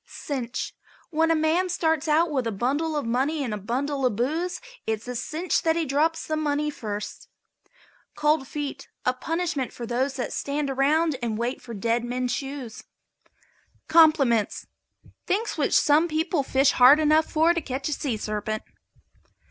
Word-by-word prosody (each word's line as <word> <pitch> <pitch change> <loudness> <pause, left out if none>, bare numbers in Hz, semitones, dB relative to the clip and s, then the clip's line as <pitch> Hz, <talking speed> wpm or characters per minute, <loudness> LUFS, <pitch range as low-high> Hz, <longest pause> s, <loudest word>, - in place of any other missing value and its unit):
CINCH. 250 -5 -4 0.4
When 325 +1 +2
a 330 - +4
man 320 +4 +1
starts 320 -3 0
out 315 +2 +3
with 260 -5 0
a - - -1
bundle 280 +10 -1
of 290 - -2
money 270 +6 0
and 235 -5 -3
a - - -2
bundle 270 +7 -2
of 250 -5 +2
booze 315 - -1 0.3
it's 220 +1 -2
a 250 - -4
cinch 315 +8 -1
that 325 -1 +2
he 335 -1 0
drops 310 +4 +1
the 310 - -1
money 300 -1 0
first. 210 -6 -6 0.9
COLD 300 -2 +1
FEET. 280 -2 -5 0.2
A 250 - +3
punishment 320 -1 -2
for 240 - -7
those 255 +3 -1
that 255 - -3
stand 285 0 -2
around 295 +3 +2
and 225 -3 -2
wait 240 +3 -2
for 235 -2 -8
dead 230 +4 0
men's 250 +1 -2
shoes. 270 -3 -5 1.1
COMPLIMENTS. 280 -10 +4 0.6
Things 425 +5 0
which - - 0
some 300 +3 +4
people 320 0 0
fish 270 +1 +3
for - - -6
hard 260 +4 +8
enough 310 +1 +3
to 330 +2 +3
catch 270 0 -3
a 300 - -1
sea 270 -5 -2
serpent. 215 0 -3
280 Hz, 165 wpm, -25 LUFS, 245-315 Hz, 1.1 s, hard